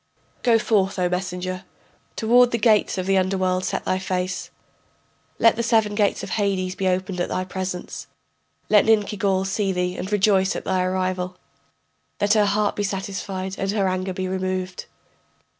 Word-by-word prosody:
] - - -39
Go 235 -2 +4
forth, 205 -4 +1
O 180 -1 +2
messenger, 180 0 -3 0.5
Toward 240 +2 +4
the 235 - 0
gates 215 -3 +3
of 185 - -2
the 195 0 +3
underworld 185 -1 0
set - - -2
thy 185 - 0
face, 185 0 -3 0.9
Let 230 - +5
the - - +1
seven 225 -3 +2
gates 205 -1 +1
of - - -6
Hades 195 -3 0
be 190 0 -2
opened 185 0 -1
at 175 - -1
thy 185 - -2
presence, 185 -1 -5 0.6
Let 210 -1 +5
Ninkigal 205 -3 +2
see 195 0 0
thee 180 0 -1
and 190 - -5
rejoice 195 -2 +3
at - - -5
thy 185 - +1
arrival, 185 0 -1 0.8
That 205 +1 +2
her 210 -2 +4
heart 205 +1 +1
be - - -2
satisfied 195 -1 -4
and 195 - -1
her 200 -1 +1
anger 185 +1 -1
be 185 0 -3
removed. 185 0 -3
190 Hz, 170 wpm, -23 LUFS, 185-205 Hz, 0.9 s, Let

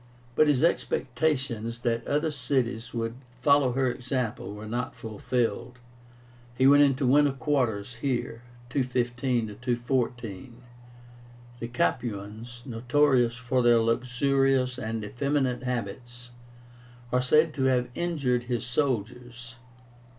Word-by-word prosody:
But 155 +4 +4
his 145 -1 +3
expectations 130 -7 0
that 115 -1 -1
other 150 +2 +1
cities 125 -4 -1
would 115 -1 -2 0.3
follow 140 -1 +4
her 130 -1 +1
example 120 -5 -3
were 105 +1 -8
not 120 +3 -3
fulfilled. 115 +2 -2 0.8
He 130 - +2
went 145 +1 +7
into 140 -1 +3
winter 145 +2 +4
quarters 125 -7 -1
here 125 -4 -2 0.3
(215 120 -4 -1
214). 120 -1 -2 1.0
The 115 - -4
Capuans, 120 0 -3
notorious 125 0 +2
for 125 +1 0
their 120 -1 +5
luxurious 125 +2 +1
and 110 -2 -3
effeminate 130 +2 -1
habits, 120 0 -5 0.8
are 125 - +2
said 155 +5 +4
to 135 -2 -1
have 125 -2 +2
injured 135 -8 -1
his 120 -1 -2
soldiers. 120 -2 -3
125 Hz, 110 wpm, -27 LUFS, 115-135 Hz, 1.0 s, went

